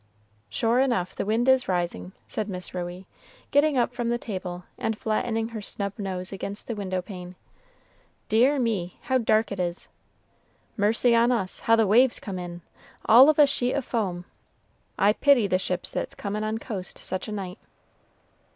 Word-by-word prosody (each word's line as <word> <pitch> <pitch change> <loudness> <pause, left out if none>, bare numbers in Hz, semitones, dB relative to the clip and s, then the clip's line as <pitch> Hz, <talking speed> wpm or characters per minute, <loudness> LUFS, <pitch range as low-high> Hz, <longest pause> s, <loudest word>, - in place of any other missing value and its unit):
"Sure 230 +2 +1
enough, 235 -10 +1
the - - -4
wind 230 +4 +1
is 260 -1 +4
rising," 175 - -2 0.2
said 215 -1 -3
Miss 180 -1 -6
Ruey, 180 +1 -5 0.5
getting 290 0 +3
up 245 0 +1
from 240 -1 -2
the 240 - +1
table, 185 -6 -6 0.2
and 220 -1 -1
flattening 225 +1 -1
her 225 -2 -6
snub 200 0 -2
nose 185 -2 -4
against 200 +1 -5
the 235 - -3
window 190 -3 -3
pane. 180 -2 -9 0.9
"Dear 250 +7 +4
me, 210 -8 -1
how 260 -1 +1
dark 220 -2 +2
it 200 - -4
is! 175 -1 -3 0.9
Mercy 225 +3 +3
on 235 +2 +4
us, 205 -6 -1
how 225 - +4
the 225 -1 +3
waves 235 +5 +4
come 190 -4 -5
in! 175 -1 -7 0.4
all 250 +6 +8
of 310 - +3
a 295 - +8
sheet 255 -2 0
of 280 -3 -2
foam. 185 -7 -2 0.7
I 205 +2 +4
pity 275 -3 +4
the 185 -2 +1
ships 180 -1 -2
that's - - -4
comin' 210 +1 -3
on 215 +1 -1
coast 200 -5 -6
such 185 - -4
a - - -5
night." 195 -1 -5
215 Hz, 175 wpm, -26 LUFS, 185-240 Hz, 0.9 s, all